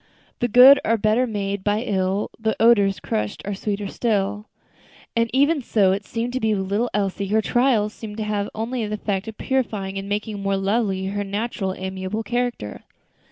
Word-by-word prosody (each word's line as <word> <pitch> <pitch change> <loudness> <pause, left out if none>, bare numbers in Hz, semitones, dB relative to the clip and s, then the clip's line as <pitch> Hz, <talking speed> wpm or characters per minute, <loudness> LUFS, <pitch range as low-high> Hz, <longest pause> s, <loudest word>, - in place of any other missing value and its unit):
"The 240 - +1
good 250 +4 +8
are 230 +1 +2
better 220 +4 +2
made 200 -3 -3
by 210 +1 +1
ill, 195 -2 -1
As 220 - +1
odors 205 -4 +4
crushed 105 -1 -3
are 205 - -2
sweeter 205 +1 -3
still;" 210 -1 -1 0.7
And 230 0 +2
even 285 +4 +3
so 205 -6 +2
it 200 +2 -2
seemed 235 +1 -3
to 260 - -1
be 220 -3 +1
with 190 -1 -3
little 230 +4 +1
Elsie; 200 -1 -1
her 215 +3 +2
trials 235 -4 +2
seemed 210 -2 -8
to 220 - -2
have 205 -1 -2
only 230 +2 -2
the 210 - -2
effect 200 -1 -3
of 220 - -7
purifying 210 -7 -2
and 195 +1 -7
making 205 0 -3
more 195 0 0
lovely 195 -1 0
her 205 +1 -2
naturally 200 -1 -3
amiable 190 +3 -4
character. 240 - -3
210 Hz, 185 wpm, -22 LUFS, 195-230 Hz, 0.7 s, good